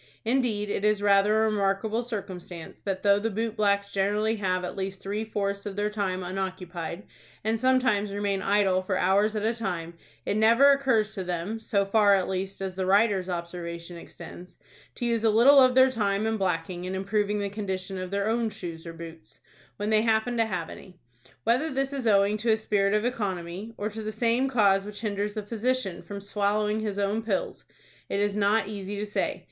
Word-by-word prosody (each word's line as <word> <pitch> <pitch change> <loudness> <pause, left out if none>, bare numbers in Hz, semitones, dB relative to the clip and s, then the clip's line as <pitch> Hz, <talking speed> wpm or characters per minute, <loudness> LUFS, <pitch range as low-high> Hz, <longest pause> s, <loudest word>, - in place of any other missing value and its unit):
Indeed, 225 -4 0
it 200 - -2
is 210 -1 +3
rather 205 +2 +4
a 220 - +3
remarkable 210 +2 0
circumstance 190 -7 -7
that 190 -1 -2
though 200 0 +5
the 225 +2 -1
boot 225 +1 -2
blacks 200 -2 +1
generally 210 +3 +1
have 185 -2 -1
at 180 - -5
least 195 0 -4
three 205 +3 -3
fourths 200 -2 -3
of 200 - -5
their 205 +1 -1
time 190 -3 -2
unoccupied, 180 -1 -5 0.4
and 220 +1 0
sometimes 255 -5 +2
remain 200 -1 -1
idle 195 -2 +2
for 185 0 -1
hours 200 +4 +2
at 210 - -1
a 225 - +2
time, 175 -7 -4 0.3
it 205 - 0
never 230 +6 +6
occurs 255 -6 +2
to 190 - -4
them 180 +5 -3
(so 200 -2 0
far, 205 0 +4
at 190 -2 0
least, 190 +1 -4
as 190 -1 -3
the 185 0 -3
writer's 195 -2 +3
observation 170 0 -5
extends) 175 +1 -11 0.4
to 240 - -3
use 230 -1 0
a 225 - +4
little 245 +6 +7
of 255 -1 +5
their 260 0 +6
time 205 -3 0
and 220 -1 -1
blacking 180 -1 -2
in 185 +1 -3
improving 205 +2 0
the 200 -1 -1
condition 190 -2 -4
of 185 0 -5
their 200 +1 -1
own 230 0 +1
shoes 170 -4 -8
or 165 - -6
boots, 165 0 -11 0.4
when 205 +1 -2
they 215 0 +4
happen 225 +2 +1
to 225 -1 +2
have 190 -5 -4
any. 185 -2 -12 0.5
Whether 250 +8 +2
this 270 0 -1
is 265 -4 -2
owing 200 0 +4
to 225 +2 -2
a 220 - +4
spirit 205 -2 +1
of 215 +2 +1
economy, 200 -2 -3
or 205 - -2
to 220 +1 -6
the 215 0 -4
same 235 +4 +1
cause 200 -6 +3
which 205 +1 -8
hinders 205 -1 -2
a 215 - -2
physician 225 -2 -2
from 200 -1 -8
swallowing 210 +1 0
his 210 -2 -3
own 205 +2 0
pills, 365 - -3 0.4
it 200 - -1
is 205 0 0
not 205 0 +2
easy 205 -1 -5
to 205 +1 -3
say. 210 - -2
205 Hz, 200 wpm, -27 LUFS, 190-220 Hz, 0.5 s, little